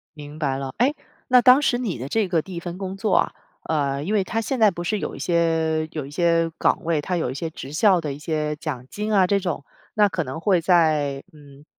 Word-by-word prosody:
明 150 Hz, 0 st, -10 dB
白 135 Hz, -4 st, -1 dB
了。 135 Hz, -1 st, -5 dB
诶， 265 Hz, +5 st, +3 dB, 0.3 s
那 250 Hz, -1 st, +6 dB
当 255 Hz, +2 st, +7 dB
时 245 Hz, -3 st, +2 dB
你 215 Hz, -, -3 dB
的 130 Hz, +3 st, -5 dB
这 215 Hz, +3 st, 0 dB
个 165 Hz, -3 st, +1 dB
第 190 Hz, -, -10 dB
1 170 Hz, -, -4 dB
份 175 Hz, 0 st, -6 dB
工 190 Hz, -1 st, -5 dB
作 210 Hz, 0 st, 0 dB
啊， -, -, +1 dB, 0.3 s
呃， 140 Hz, -3 st, -1 dB
因 195 Hz, +8 st, -2 dB
为 200 Hz, -3 st, +2 dB
它 225 Hz, +4 st, -2 dB
现 255 Hz, +4 st, -2 dB
在 215 Hz, -2 st, +6 dB
不 175 Hz, -2 st, -6 dB
是 210 Hz, +4 st, 0 dB
有 -, -, -4 dB
一 -, -, -9 dB
些 165 Hz, -2 st, +1 dB
有 155 Hz, -3 st, -4 dB
一 -, -, -11 dB
些 165 Hz, +1 st, +2 dB
岗 -, -, +1 dB
位， 165 Hz, -2 st, +1 dB
它 180 Hz, +5 st, -2 dB
有 160 Hz, -7 st, -1 dB
一 130 Hz, -, -5 dB
些 160 Hz, +3 st, -4 dB
职 140 Hz, -3 st, -9 dB
校 185 Hz, +3 st, +4 dB
的 150 Hz, -3 st, -4 dB
一 140 Hz, -, -8 dB
些 150 Hz, -1 st, -2 dB
奖 145 Hz, -6 st, -5 dB
金 210 Hz, +5 st, -4 dB
啊， 190 Hz, -2 st, +5 dB
这 200 Hz, +2 st, +2 dB
种。 170 Hz, -6 st, -3 dB, 0.3 s
那 210 Hz, -1 st, +4 dB
可 180 Hz, -, -2 dB
能 135 Hz, 0 st, -6 dB
会 180 Hz, +1 st, +2 dB
在 155 Hz, -5 st, +2 dB
嗯， 145 Hz, -2 st, -16 dB
165 Hz, 265 characters per minute, -23 LUFS, 150-195 Hz, 0.3 s, 当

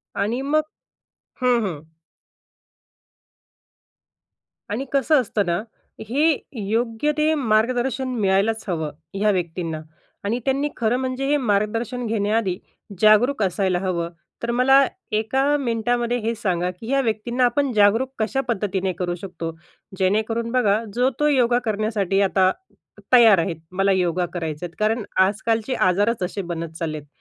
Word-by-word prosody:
आणि 220 Hz, +6 st, -1 dB
मग 300 Hz, +3 st, +2 dB, 0.8 s
हं, 245 Hz, -2 st, +3 dB
हं. 160 Hz, -6 st, -5 dB, 2.9 s
आणि 235 Hz, +7 st, -3 dB
कसं 275 Hz, +1 st, +4 dB
असतं 210 Hz, -3 st, -1 dB
ना, 175 Hz, +2 st, 0 dB, 0.5 s
हे 295 Hz, +4 st, +3 dB, 0.3 s
योग्य 230 Hz, +5 st, 0 dB
ते 305 Hz, +1 st, +3 dB
मार्गदर्शन 245 Hz, +1 st, +1 dB
मिळायलाच 200 Hz, +3 st, +1 dB
हवं, 160 Hz, -5 st, -2 dB, 0.2 s
ह्या 205 Hz, +2 st, +2 dB
व्यक्तींना. 170 Hz, -3 st, -3 dB, 0.4 s
आणि 225 Hz, +4 st, -1 dB
त्यांनी 275 Hz, +2 st, +1 dB
खरं 235 Hz, +1 st, +1 dB
म्हणजे 260 Hz, +1 st, -2 dB
हे 295 Hz, +1 st, +3 dB
मार्गदर्शन 230 Hz, +1 st, -1 dB
घेण्याआधी 210 Hz, -3 st, 0 dB, 0.4 s
जागरूक 215 Hz, +3 st, +5 dB
असायला 185 Hz, -1 st, 0 dB
हवं. 175 Hz, -3 st, -2 dB, 0.3 s
तर 235 Hz, -, 0 dB
मला 270 Hz, +3 st, +5 dB, 0.3 s
एका 220 Hz, +6 st, +1 dB
मिनिटामध्ये 240 Hz, -1 st, 0 dB
हे 225 Hz, +2 st, -1 dB
सांगा, 180 Hz, -5 st, -1 dB
की 220 Hz, +7 st, -8 dB
या 275 Hz, 0 st, +3 dB
व्यक्तींना 240 Hz, +2 st, 0 dB
आपण 270 Hz, +3 st, +1 dB
जागरूक 215 Hz, +5 st, +3 dB
कशा 225 Hz, +5 st, 0 dB
पद्धतीने 195 Hz, -3 st, -1 dB
करू 175 Hz, 0 st, -3 dB
शकतो? 170 Hz, -4 st, -5 dB, 0.5 s
जेणेकरून 220 Hz, +4 st, 0 dB
बघा, 225 Hz, -3 st, +2 dB
जो-तो 260 Hz, +4 st, +1 dB
योगा 245 Hz, -4 st, +3 dB
करण्यासाठी 210 Hz, -3 st, 0 dB
आता 190 Hz, -1 st, +3 dB, 0.6 s
तयार 230 Hz, -6 st, +8 dB
आहेत, 165 Hz, 0 st, -1 dB, 0.2 s
मला 195 Hz, +2 st, +1 dB
योगा 180 Hz, -1 st, +1 dB
करायचं 160 Hz, -2 st, -4 dB
आहेत. 170 Hz, -, -10 dB
कारण 220 Hz, +2 st, +1 dB, 0.2 s
आजकालचे 225 Hz, +4 st, -1 dB
आजारच 205 Hz, +1 st, +1 dB
असे 190 Hz, +3 st, -3 dB
बनत 165 Hz, -1 st, -5 dB
चालले 155 Hz, -2 st, -3 dB
आहेत. 150 Hz, -1 st, -11 dB
220 Hz, 130 wpm, -22 LUFS, 190-245 Hz, 2.9 s, तयार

